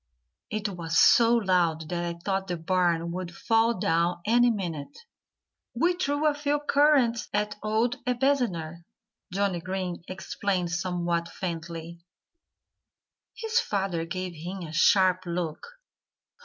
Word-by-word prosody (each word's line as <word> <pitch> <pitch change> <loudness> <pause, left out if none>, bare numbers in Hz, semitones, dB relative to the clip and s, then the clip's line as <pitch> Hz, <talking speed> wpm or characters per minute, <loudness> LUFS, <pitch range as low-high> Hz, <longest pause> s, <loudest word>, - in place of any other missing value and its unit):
"It 215 0 -2
was 170 -3 -3
so 235 0 +6
loud 175 -7 +1
that 175 -1 -2
I 170 0 -4
thought 195 -1 -1
the 175 -2 -2
barn 170 -1 +1
would 180 0 -4
fall 225 +1 +2
down 170 0 +1
any 240 +2 +4
minute." 175 -10 -4 0.8
"We 340 +9 +2
threw 290 -4 -1
a 300 - +4
few 290 0 0
currants 285 -5 +3
at 210 0 -1
old 220 +3 0
Ebenezer," 240 - 0 0.5
Johnnie 190 -2 0
Green 185 -1 -4
explained 185 -1 -2
somewhat 170 -1 -1
faintly. 170 -1 -6 1.4
His 450 +1 0
father 195 - -1
gave 185 +1 -4
him 175 +4 -6
a 160 -2 -8
sharp 185 +2 +4
look. 170 -3 -3
185 Hz, 125 wpm, -27 LUFS, 170-230 Hz, 1.4 s, so